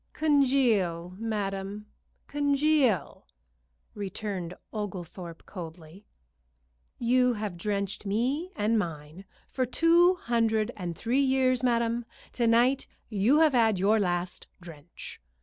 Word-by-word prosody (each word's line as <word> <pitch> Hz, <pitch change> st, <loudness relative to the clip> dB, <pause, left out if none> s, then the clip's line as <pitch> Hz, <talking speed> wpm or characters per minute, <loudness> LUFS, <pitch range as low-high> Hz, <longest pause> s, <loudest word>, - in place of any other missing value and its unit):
"Congeal, 240 Hz, -, +2 dB
madam, 205 Hz, -2 st, -3 dB, 0.4 s
congeal!" 285 Hz, -, +1 dB, 0.7 s
returned 195 Hz, -3 st, -5 dB, 0.2 s
Oglethorpe, 180 Hz, -5 st, -6 dB
coldly. 170 Hz, +1 st, -10 dB, 0.9 s
"You 250 Hz, +1 st, +3 dB
have 210 Hz, -4 st, -4 dB
drenched 200 Hz, +2 st, -3 dB
me 260 Hz, -, -1 dB
and 220 Hz, -2 st, +1 dB
mine 165 Hz, 0 st, -6 dB, 0.3 s
for 260 Hz, -, 0 dB
two 340 Hz, +7 st, +4 dB
hundred 225 Hz, -7 st, 0 dB
and 175 Hz, -4 st, -5 dB
three 245 Hz, +7 st, +1 dB
years, 260 Hz, -2 st, +2 dB
madam. 235 Hz, -1 st, +1 dB, 0.3 s
To 235 Hz, -2 st, 0 dB
night 245 Hz, +4 st, +3 dB, 0.2 s
you 225 Hz, +9 st, +3 dB
have 310 Hz, -3 st, +4 dB
had 225 Hz, -4 st, +3 dB
your 205 Hz, +4 st, +3 dB
last 175 Hz, -2 st, -2 dB
drench." 170 Hz, -, -11 dB
215 Hz, 105 wpm, -28 LUFS, 185-255 Hz, 0.9 s, two